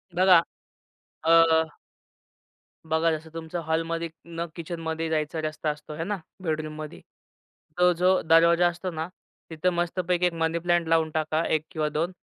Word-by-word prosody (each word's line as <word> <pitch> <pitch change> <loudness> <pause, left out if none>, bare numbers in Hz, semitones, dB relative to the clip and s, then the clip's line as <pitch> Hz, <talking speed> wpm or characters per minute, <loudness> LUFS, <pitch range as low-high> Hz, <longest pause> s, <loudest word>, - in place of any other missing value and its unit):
बघा, 180 -2 +6 0.8
अ 165 +1 +6 1.5
बघा 160 +1 +2
जसं 160 +1 -4
तुमचं 165 +1 -5
हॉलमध्ये 165 +1 -1 0.2
न 170 0 -4
किचनमध्ये 165 -1 -4
जायचा 155 0 -1
रस्ता 155 0 -2
असतो 150 +1 -6
हे 165 - -3
ना 205 +2 -2 0.3
बेडरूममध्ये? 155 -1 -4 0.8
तो 180 0 +6
जो 180 +2 +3
दरवाजा 170 +2 +5
असतो 175 +1 -3
ना 160 +1 -4 0.4
तिथं 165 +3 0
मस्तपैकी 175 +1 0
एक 175 - +1
मनी 165 0 0
प्लांट 175 -1 +1
लावून 160 -1 +2
टाका 155 +1 0
1 155 - +2
किंवा 155 -2 -1
2 165 +5 -1
165 Hz, 140 wpm, -26 LUFS, 160-175 Hz, 1.5 s, बघा